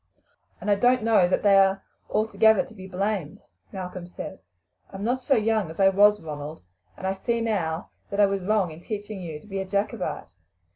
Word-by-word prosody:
"And 210 - -1
I - - +7
don't 245 +4 +3
know 220 -5 +4
that 180 - 0
they 200 -1 +6
are 195 0 +3 0.3
altogether 220 -1 +3
to - - -15
be 190 -3 -10
blamed," 190 -4 -3 0.3
Malcolm 185 -2 -6
said. 175 - -8 0.5
"I - - -11
am 195 - -5
not 250 +4 0
so 270 +2 +2
young 215 -5 +1
as 160 - -10
I 195 0 +6
was, 205 +2 +5
Ronald, 150 - -7 0.3
and - - -7
I 190 - +1
see 230 +4 -1
now 180 -8 -2 0.2
that 200 - -3
I 205 - +7
was 195 -1 -1
wrong 195 -2 +1
in 155 - -10
teaching 205 0 -6
you 160 -4 -6
to - - -19
be 195 -2 -4
a 190 - -3
Jacobite. 200 - -2
195 Hz, 205 wpm, -25 LUFS, 185-215 Hz, 0.5 s, I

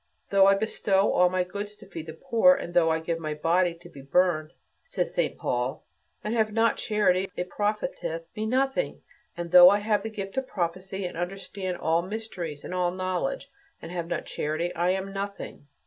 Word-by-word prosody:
"Though 195 -1 +6
I 195 - +6
bestow 195 -1 +1
all 180 0 +5
my 185 0 +1
goods 205 +3 -6
to 210 0 -15
feed 165 -4 -8
the 160 - -6
poor, 240 +9 +4
and 175 - -6
though 170 -2 +4
I 160 0 +1
give 165 +1 -3
my 155 -2 -3
body 170 +3 +2
to 175 +1 -15
be 140 -5 -12
burned," 155 +2 +1 0.3
says - - -3
St - - 0
Paul, 125 +2 -2 0.4
"and 210 - -2
have 220 -2 +1
not 225 +1 +2
charity, 195 -3 +1
it 180 0 -3
profiteth 205 -5 -2
me 215 0 -2
nothing. 270 - 0 0.3
And 170 -1 -5
though 180 0 +10
I 200 - +4
have 210 0 +1
the 220 - -4
gift 195 0 -6
of 265 -1 -1
prophecy 185 +1 -3
and 175 - -5
understand 185 +1 -4
all 165 +1 +1
mysteries 185 -6 -6
and - - -6
all 180 -1 +1
knowledge, 185 - -3 0.3
and 165 - -9
have 170 -2 -3
not 170 -2 -3
charity, 160 +4 -2
I 175 +2 +1
am 190 +1 -1
nothing. 200 -7 -6
185 Hz, 195 wpm, -27 LUFS, 170-205 Hz, 0.4 s, though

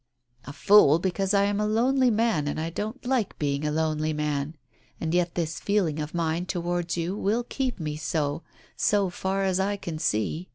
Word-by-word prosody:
"A - - -7
fool 160 -1 +6
because 190 +2 -1
I 200 -1 +4
am 205 0 0
a 210 - +1
lonely 250 +4 +3
man 220 -9 +1
and 160 +3 -3
don't 220 +8 -5
like 250 -5 0
being 140 -1 -1
a 150 - 0
lonely 155 0 0
man, 150 0 -2 0.4
and 160 0 -2
yet 175 -1 +1
this 165 -2 -2
feeling 185 -7 0
of 150 +2 -5
mine 170 +1 -1
towards 175 -1 -2
you 170 +3 -2
will 215 +4 0
keep 255 -2 -3
me 150 -2 -3
so, 150 0 -1 0.3
so 200 -3 +2
far 190 +2 -1
as 190 -1 +1
I 200 +1 0
can 165 -5 -6
see. 155 - -1
175 Hz, 190 wpm, -26 LUFS, 155-205 Hz, 0.4 s, fool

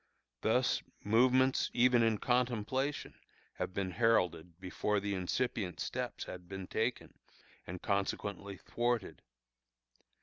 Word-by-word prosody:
Thus - - +2 0.2
movements 130 +5 +4
even 125 0 +5
in 115 -2 +3
contemplation 125 +4 0 0.5
have - - -2
been 95 0 -2
heralded 90 -6 +1
before 100 +3 -1
the 100 0 -2
incipient 95 0 -1
steps - - -3
had 90 -1 -9
been 95 -1 -5
taken, 115 +6 -2 0.5
and 90 +1 -7
consequently 100 0 -2
thwarted. 120 -3 -2
105 Hz, 105 wpm, -34 LUFS, 95-120 Hz, 0.5 s, even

